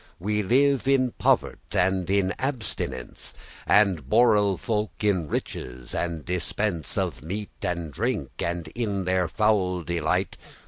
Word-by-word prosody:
*laymen*<13> 85 - -18
We 105 0 +1
live 135 +6 +3
in 130 -2 +3
povert', - - +1
and 95 0 +2
in 95 -1 +2
abstinence, 110 - -2 0.3
And 95 -10 +3
borel 105 - +4
folk 105 -1 -2
in 95 -6 +2
riches 60 -3 -5
and 85 -4 -2
dispence 90 0 -1
Of - - -1
meat 100 +6 -5
and 85 -4 -3
drink, 110 - -1
and 85 -1 -2
in 100 -5 -2
their 90 -1 +2
foul 95 -5 +1
delight. 85 +2 -1
95 Hz, 135 wpm, -26 LUFS, 85-105 Hz, 0.3 s, borel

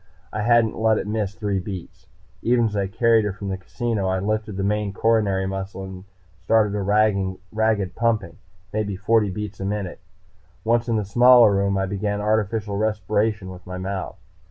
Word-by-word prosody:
I 105 - -2
hadn't 115 0 +3
let 110 -1 +3
it - - -2
miss 105 -2 -2
three 105 -3 -1
beats. 90 -1 -8 0.3
Even 120 0 +3
as 105 -2 -2
I 100 -1 0
carried 115 +2 +3
her 105 -2 -2
from 100 0 -6
the 95 - -2
casino, 105 +1 -2
I 95 0 +1
lifted 105 +1 -2
the 95 - -1
main 105 0 0
coronary 100 -3 +2
muscle 95 0 -5
and 95 0 -9 0.4
started 105 +1 +3
a 105 - -1
ragged 100 0 +1
pumping, 110 -8 0 0.4
maybe 105 -2 -1
forty 105 +2 +2
beats 105 +1 -6
a 95 - -3
minute. 100 -2 -3 0.6
Once 115 +2 +1
in 115 - +2
the 105 -2 0
smaller 120 +1 +6
room 100 0 +1
I 95 - +1
began 100 +1 -2
artificial 105 -1 0
respiration 105 -1 0
with 90 0 -12
my 90 0 -5
mouth. 95 0 -4
105 Hz, 180 wpm, -23 LUFS, 95-110 Hz, 0.6 s, smaller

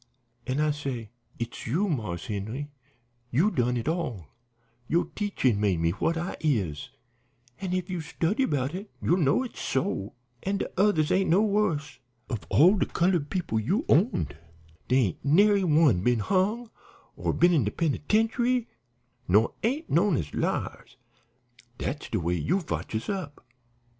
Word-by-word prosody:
An' 130 +3 -1
I 150 0 +2
say, 130 -7 -5 0.3
'It's 115 +1 -5
you, 170 - +1
Marse 110 - -3
Henry; 115 +7 -4 0.6
you 165 - +2
done 125 - +1
it 115 - -4
all; 125 - -2 0.6
yo' 170 +2 +2
teachin' 135 - 0
made 100 -5 +1
me 85 0 +2
what 165 - -1
I 175 +3 -3
is, 100 - -1 0.7
an' 185 -2 -3
if 185 -1 -1
you 180 -3 -3
study 165 - -1
about 145 - 0
it 200 +3 -6
you'll 175 - +2
know 150 - +2
it's 250 - -8
so. 105 -6 -2 0.3
An' 195 +1 -1
de - - -2
others 185 -5 +2
ain't 190 +1 +2
no 185 +6 +4
wus'. 185 - 0 0.3
Of 115 -5 -4
all 180 +8 +6
de - - +1
colored 170 -4 +1
people 170 - -1
you 195 - 0
owned, 170 - +2 0.5
dere 130 0 +4
ain't - - -11
nary 200 +7 +4
one 150 - +4
been 125 +4 +2
hung, 210 - 0 0.4
or - - -1
been 175 +1 +4
in 150 -7 +3
de - - +1
penitentiary, 225 - +1 0.6
nor 105 +5 +3
ain't 275 +8 -1
knowed 170 0 +3
as 75 -8 -4
liars. - - -3 0.8
Dat's 145 - -4
de - - -1
way 85 +1 -1
you 140 - +1
fotch 160 - -4
us 110 - -3
up.' 180 -10 -5
155 Hz, 160 wpm, -27 LUFS, 120-195 Hz, 0.8 s, all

